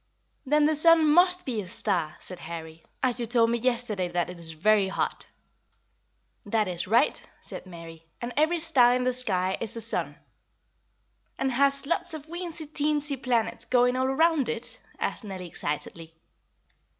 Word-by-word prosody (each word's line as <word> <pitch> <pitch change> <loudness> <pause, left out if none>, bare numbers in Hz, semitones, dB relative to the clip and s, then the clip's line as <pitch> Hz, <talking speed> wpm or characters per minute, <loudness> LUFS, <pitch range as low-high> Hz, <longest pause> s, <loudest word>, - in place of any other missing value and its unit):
"Then 300 +2 +4
the 310 +1 +2
sun 325 +1 +5
must 360 +1 +4
be 235 -5 -2
a 190 - -9
star," 180 -4 -1
said 180 -1 -7
Harry, 160 -1 -8 0.2
"as 250 -1 +2
you 235 - -2
told 230 -1 +3
me 235 - 0
yesterday 230 -6 0
that 175 0 -2
it 180 - -11
is 165 -1 -7
very 200 +4 +3
hot." 190 - -2 1.2
"That 215 0 0
is 175 -1 -4
right," 230 +5 +2 0.2
said - - -9
Mary; 165 -2 -11
"and 240 +1 -5
every 315 +3 +2
star 250 -7 +4
in 250 - 0
the 255 0 +1
sky 190 -7 -1
is 230 - -2
a - - -2
sun." 230 - +1 1.2
"And 270 0 0
has 275 +2 +2
lots 325 +1 -1
of 300 -2 -9
weensy 340 -1 -6
teensy 295 -1 -1
planets 245 -4 -1
going 250 0 +3
all 260 0 +1
around 290 -1 +2
it?" 235 0 -3 0.2
asked - - -3
Nellie 190 -3 -7
excitedly. 160 +2 -5
240 Hz, 165 wpm, -27 LUFS, 185-285 Hz, 1.2 s, sun